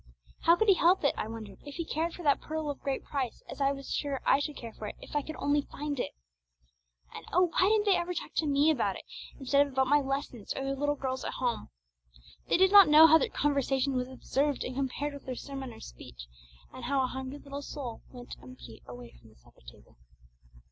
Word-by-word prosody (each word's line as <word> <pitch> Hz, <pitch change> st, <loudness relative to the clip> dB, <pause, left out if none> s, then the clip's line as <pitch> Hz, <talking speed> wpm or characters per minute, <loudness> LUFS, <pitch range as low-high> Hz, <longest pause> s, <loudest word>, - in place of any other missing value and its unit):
How 335 Hz, -, +5 dB
could 440 Hz, +5 st, +1 dB
he 395 Hz, -, +8 dB
help 360 Hz, 0 st, +3 dB
it, 280 Hz, -, +3 dB
I -, -, -3 dB
wondered, 220 Hz, -1 st, -8 dB
if 285 Hz, -1 st, -9 dB
he 335 Hz, -, -3 dB
cared 325 Hz, +2 st, -2 dB
for 350 Hz, -, -9 dB
that 285 Hz, -2 st, +3 dB
Pearl 310 Hz, -1 st, -3 dB
of 280 Hz, -, -9 dB
Great 275 Hz, -2 st, -2 dB
Price 265 Hz, -5 st, -4 dB
as -, -, -8 dB
I 275 Hz, 0 st, +3 dB
was 275 Hz, -1 st, -5 dB
sure 280 Hz, -2 st, -2 dB
I -, -, +4 dB
should 290 Hz, 0 st, -3 dB
care 230 Hz, -2 st, -8 dB
for 215 Hz, -, -7 dB
it -, -, -7 dB
if -, -, -11 dB
I 295 Hz, -, +2 dB
could 315 Hz, +2 st, -7 dB
only 290 Hz, 0 st, +1 dB
find 290 Hz, -1 st, -5 dB
it! -, -, -3 dB, 1.0 s
And -, -, -8 dB
oh, 360 Hz, 0 st, +3 dB
why 370 Hz, -, +4 dB
didn't 430 Hz, -1 st, +3 dB
they 400 Hz, -2 st, +4 dB
ever 355 Hz, +1 st, -3 dB
talk -, -, -5 dB
to 315 Hz, -, +2 dB
me 290 Hz, +2 st, +4 dB
about 205 Hz, -10 st, 0 dB
it, -, -, -9 dB, 0.4 s
instead 280 Hz, +1 st, +3 dB
of 280 Hz, -, -12 dB
about 265 Hz, 0 st, +2 dB
my 290 Hz, +3 st, +4 dB
lessons 270 Hz, -5 st, -4 dB
or 270 Hz, -, -3 dB
their 275 Hz, 0 st, -2 dB
little 290 Hz, +1 st, 0 dB
girls 260 Hz, -2 st, -3 dB
at -, -, -4 dB
home? 245 Hz, -, -2 dB, 0.8 s
They -, -, +3 dB
did 380 Hz, +1 st, +5 dB
not 400 Hz, -3 st, +9 dB
know 305 Hz, +2 st, +9 dB
how 320 Hz, 0 st, +7 dB
their 460 Hz, -, 0 dB
conversation 275 Hz, -, 0 dB
was 250 Hz, -1 st, -1 dB
observed 275 Hz, +2 st, -1 dB
and 255 Hz, -, -5 dB
compared 275 Hz, +2 st, -2 dB
with 280 Hz, -, -11 dB
their 255 Hz, -, -3 dB
sermon 270 Hz, -1 st, -7 dB
or 225 Hz, -, -12 dB
speech, -, -, -11 dB, 0.5 s
and -, -, -8 dB
how 275 Hz, -1 st, +1 dB
a -, -, +2 dB
hungry 265 Hz, +2 st, -5 dB
little 280 Hz, 0 st, -7 dB
soul 270 Hz, -5 st, -7 dB
went 245 Hz, -1 st, -10 dB
empty 125 Hz, -3 st, -12 dB
away 120 Hz, -1 st, -10 dB
from -, -, -19 dB
the -, -, -22 dB
supper -, -, -23 dB
table. -, -, -16 dB
280 Hz, 240 wpm, -30 LUFS, 255-300 Hz, 1.0 s, not